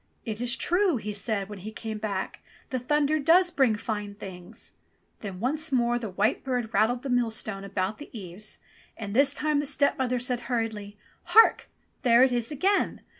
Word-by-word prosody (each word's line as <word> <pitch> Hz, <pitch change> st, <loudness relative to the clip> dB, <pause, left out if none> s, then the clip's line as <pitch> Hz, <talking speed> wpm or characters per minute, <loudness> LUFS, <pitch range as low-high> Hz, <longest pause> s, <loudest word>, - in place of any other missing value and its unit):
"It 220 Hz, -1 st, -4 dB
is 245 Hz, +1 st, +3 dB
true," 355 Hz, -2 st, +2 dB
he 210 Hz, -1 st, -5 dB
said 200 Hz, -1 st, -2 dB
when 205 Hz, -1 st, -8 dB
he 210 Hz, +4 st, -7 dB
came 220 Hz, -1 st, -6 dB
back. 200 Hz, -3 st, -3 dB, 0.3 s
''The 255 Hz, -, -1 dB
thunder 295 Hz, +4 st, +1 dB
does 350 Hz, +5 st, +4 dB
bring 260 Hz, -8 st, +3 dB
fine 210 Hz, -2 st, -4 dB
things 195 Hz, +1 st, -9 dB, 0.2 s
!" -, -, -43 dB
Then 195 Hz, -4 st, -6 dB
once 300 Hz, +8 st, -1 dB
more 240 Hz, -2 st, +2 dB
the 225 Hz, -3 st, -5 dB
white 205 Hz, +6 st, 0 dB
bird 245 Hz, -4 st, -2 dB
rattled 230 Hz, +5 st, +2 dB
the 275 Hz, -, -4 dB
millstone 220 Hz, -4 st, -1 dB
about 195 Hz, +1 st, -2 dB
the 295 Hz, -, -10 dB
eaves, 205 Hz, -1 st, -6 dB, 0.4 s
and 205 Hz, -3 st, -5 dB
this 275 Hz, +2 st, +5 dB
time 300 Hz, 0 st, 0 dB
the 290 Hz, -, -1 dB
stepmother 265 Hz, -3 st, +1 dB
said 250 Hz, 0 st, -1 dB
hurriedly, 220 Hz, -4 st, -3 dB, 0.3 s
"Hark! 450 Hz, -, +5 dB, 0.3 s
there 240 Hz, -1 st, +6 dB
it 260 Hz, -, +4 dB
is 240 Hz, +2 st, -1 dB
again! 385 Hz, +8 st, +1 dB
235 Hz, 180 wpm, -27 LUFS, 210-270 Hz, 0.4 s, there